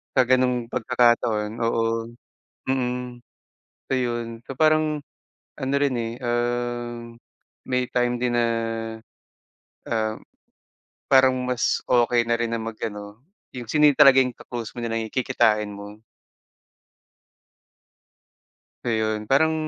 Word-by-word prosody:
sa 130 - +6
gano'ng 125 -1 +1
pagkakataon 120 -4 +2 0.2
oo. 115 0 -1 0.5
Mm. 125 -1 -2 0.7
So 135 - -1
yun. 120 -2 -3
So 135 - -7
parang 155 -1 +3 0.6
ano 135 -1 -2
rin, 140 -3 +1
eh, 115 -1 -3
um, 120 -1 -2 0.5
may 125 -1 -1
time 120 0 0
din 120 -1 0
na, 120 -1 +3 1.4
um, 110 -1 -1 0.9
parang 130 -1 +6
mas 125 -1 0
okey 120 -1 +3
na 115 - +1
rin 120 -1 -1
na 115 - 0
mag-ano 110 -1 -6 0.3
yung 120 -3 -7
sino 150 -1 +4
yung 145 - +4
talaga 135 -1 +7 0.2
ka-close 120 -3 -7
mo, 120 - -5
yun 115 - -3
nalang 115 -1 -2
kikitain 105 -4 +2
mo. 100 +1 -9 2.9
Ayun. 110 -2 -1
Parang, 160 +6 +3
120 Hz, 115 wpm, -24 LUFS, 115-125 Hz, 2.9 s, talaga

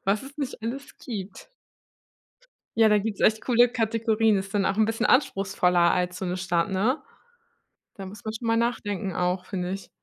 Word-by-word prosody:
was 200 +2 +1
es 275 +2 -12
nicht 265 -5 -4
alles 265 +5 -6
gibt. 200 - -7 1.3
Ja, 225 -1 +6
da 210 -1 +4
gibt's 205 0 -4
echt 220 0 +3
coole 245 -1 +4
Kategorien. 225 -2 +1
Ist 195 0 -4
dann 200 -2 +1
auch 195 - 0
'n 220 - +4
bisschen 225 +2 0
anspruchsvoller 190 -8 +3
als 180 0 -1
so - - -4
'ne 180 0 -2
Stadt, 175 0 0
ne? 215 +9 +1 1.0
Da 195 - -8
muss 205 +2 -10
man 215 0 -4
schon 230 - -7
mal 225 - +3
nachdenken 205 -5 -1
auch, 180 +1 -1
finde 180 -2 -3
ich. 195 +1 -6
210 Hz, 185 wpm, -26 LUFS, 190-230 Hz, 1.3 s, Ja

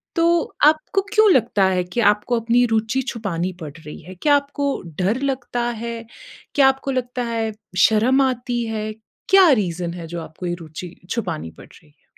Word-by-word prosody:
तो 335 0 +2
आपको 310 +6 +3
क्यों 430 -2 +6
लगता 210 - +3
है 180 - +1
कि 240 - -1
आपको 230 +3 -2
अपनी 240 +2 +3
रूचि 225 +4 +1
छुपानी 185 -5 -3
पड़ 150 -2 -6
रही 150 - -8
है? 180 +3 -11
क्या 290 - +3
आपको 285 0 -1 0.4
डर 225 +8 +1
लगता 245 -2 -4 0.2
है? 235 0 -3 0.6
क्या 275 -2 +6
आपको 270 +1 -2
लगता 245 0 -4
है 225 -1 -1 0.3
शर्म 240 +5 +3
आती 245 -1 -2
है? 215 -1 -3 0.4
क्या 385 -3 +7
रीज़न 170 -1 -4
है 165 - -7
जो 170 - -3
आपको 160 +3 -9
ये 175 - -1
रूचि 165 +3 -9 0.2
छुपानी 170 - -3
पड़ - - -14
रही 75 - -19
है? - - -34
230 Hz, 175 wpm, -21 LUFS, 180-265 Hz, 0.6 s, क्या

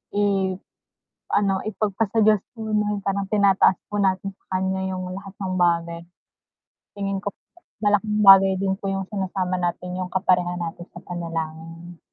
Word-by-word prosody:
iano, 195 -2 -1 0.9
ipagpa 215 0 -1
sa 220 +2 +2
diyos 215 -2 +5 0.2
muna 210 -2 -1
parang 195 0 -1
tinataas 200 -3 +4 0.2
po 205 - 0
natin 195 0 0
sa - - -39
kanya 190 0 -1
yung 185 -1 -4
lahat 195 +1 -8
ng 190 -2 -3
bagay. 170 -1 +1 1.0
Tingin 195 -1 -2
ko 200 - -2 0.6
malaking 210 +1 +2
bagay 195 0 +9
din 190 0 0
po 195 - -3
yung 195 0 -2
sinasama 185 -2 -2
natin 180 +1 -3
yung 185 -1 -3
kaparehan 180 -2 +1
natin 175 +1 -6
sa - - -11
panalangin. 165 0 -6
190 Hz, 145 wpm, -23 LUFS, 180-200 Hz, 1.0 s, bagay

